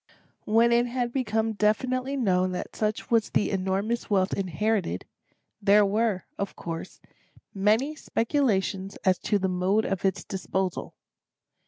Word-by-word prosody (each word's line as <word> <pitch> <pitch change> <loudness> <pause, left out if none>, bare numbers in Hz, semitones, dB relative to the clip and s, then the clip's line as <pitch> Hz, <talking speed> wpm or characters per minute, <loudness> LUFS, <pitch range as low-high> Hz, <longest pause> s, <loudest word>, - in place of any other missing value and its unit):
{*1} 210 - -3
When 235 +1 +5
it 240 +1 +3
had 240 -1 -2
become 225 -3 0
definitely 255 +6 0
known 185 -6 +1
that 180 - -5
such 215 +1 -2
was 225 -2 +3
the - - +1
enormous 195 +5 -1
wealth 190 -2 +2
inherited, 195 +2 -1 0.6
there 205 +1 +5
were, 210 -1 0 0.2
of 200 - -3
course, 165 -1 -6 0.5
many 220 +10 +2
speculations 210 -9 0
as 185 -1 +3
to 205 - +1
the 190 -1 0
mode 185 +4 +1
of 195 - -2
its 190 -1 0
disposal. 190 -1 -3
210 Hz, 140 wpm, -27 LUFS, 190-230 Hz, 0.6 s, When